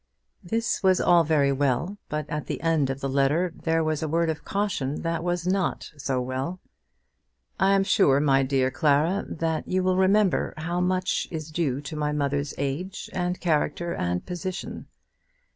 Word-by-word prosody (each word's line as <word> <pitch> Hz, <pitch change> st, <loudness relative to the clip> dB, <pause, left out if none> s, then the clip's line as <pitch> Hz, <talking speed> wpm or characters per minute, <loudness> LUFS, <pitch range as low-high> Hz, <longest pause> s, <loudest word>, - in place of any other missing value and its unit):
This 225 Hz, +6 st, -1 dB
was 190 Hz, -2 st, +4 dB
all 175 Hz, -1 st, +5 dB
very 145 Hz, -3 st, +2 dB
well, 140 Hz, +8 st, 0 dB
but 150 Hz, -1 st, -3 dB
at 150 Hz, -2 st, -4 dB
the -, -, -3 dB
end 160 Hz, -5 st, +2 dB
of 135 Hz, +1 st, -4 dB
the 135 Hz, -, -1 dB
letter 145 Hz, +6 st, +1 dB
there 165 Hz, 0 st, 0 dB
was 155 Hz, -1 st, -1 dB
a 160 Hz, -, -1 dB
word 165 Hz, +1 st, +1 dB
of 155 Hz, -, -7 dB
caution 195 Hz, -9 st, -2 dB
that 165 Hz, 0 st, -1 dB
was 175 Hz, -1 st, -1 dB
not 185 Hz, -1 st, -1 dB
so 135 Hz, -3 st, -2 dB
well. 130 Hz, +8 st, -3 dB, 1.0 s
"I 195 Hz, +1 st, +4 dB
am 195 Hz, -, +3 dB
sure, 140 Hz, -8 st, +4 dB
my 135 Hz, -2 st, +3 dB
dear 130 Hz, -1 st, +1 dB
Clara, 155 Hz, +6 st, +2 dB
that 160 Hz, -1 st, -2 dB
you 185 Hz, 0 st, 0 dB
will 185 Hz, 0 st, +2 dB
remember 190 Hz, +1 st, +2 dB
how 170 Hz, +3 st, -2 dB
much 185 Hz, +1 st, 0 dB
is 155 Hz, -2 st, -6 dB
due 145 Hz, -5 st, -1 dB
to 145 Hz, +2 st, -7 dB
my 150 Hz, -1 st, -1 dB
mother's 145 Hz, 0 st, -1 dB
age, 145 Hz, +8 st, -4 dB
and 180 Hz, 0 st, -1 dB
character, 170 Hz, 0 st, 0 dB
and 90 Hz, 0 st, -2 dB
position. 180 Hz, +1 st, -5 dB
160 Hz, 175 wpm, -26 LUFS, 140-180 Hz, 1.0 s, all